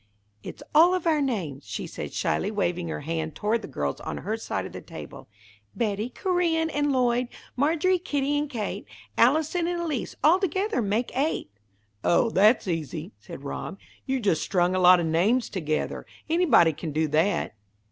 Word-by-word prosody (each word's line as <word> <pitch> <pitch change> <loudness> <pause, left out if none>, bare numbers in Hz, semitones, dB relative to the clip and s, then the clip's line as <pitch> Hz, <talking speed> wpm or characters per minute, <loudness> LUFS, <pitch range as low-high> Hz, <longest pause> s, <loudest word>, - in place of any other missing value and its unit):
"It's - - -9
all 345 +4 +6
of 365 - -3
our 315 -3 +3
names," 175 - -3
she - - -4
said, - - -6
shyly, 200 - 0
waving 180 -4 -1
her 160 - -4
hand 160 0 -3
toward 220 +2 0
the - - -7
girls 70 -1 -3
on - - -5
her - - -3
side - - -3
of - - -8
the - - -8
table. - - -10 0.5
"Betty, 215 0 -1
Corinne, 335 0 0
and 290 0 +1
Lloyd, 250 -1 +2 0.3
Margery, 325 +7 +2
Kitty, 290 -5 -1
and 290 0 -1
Kate, 230 -7 -4 0.3
Allison 320 +2 +3
and 350 0 -1
Elise 310 -8 -3
all 330 +5 +6
together 385 - 0
make 215 +3 -1
eight." 275 - -1 0.5
"Oh, 225 +6 +3
that's 210 +3 +4
easy," 165 +1 -3
said 170 -6 -10
Rob. 145 +6 -5 0.3
"You 265 0 0
just 200 -9 +1
strung 180 -1 +1
a 185 - +1
lot 180 0 +7
of 170 - 0
names 195 +10 +2
together. 155 -5 -2 0.2
Anybody 310 - +4
can 155 +1 -6
do 155 +2 +1
that." 165 - +1
230 Hz, 175 wpm, -26 LUFS, -, 0.5 s, lot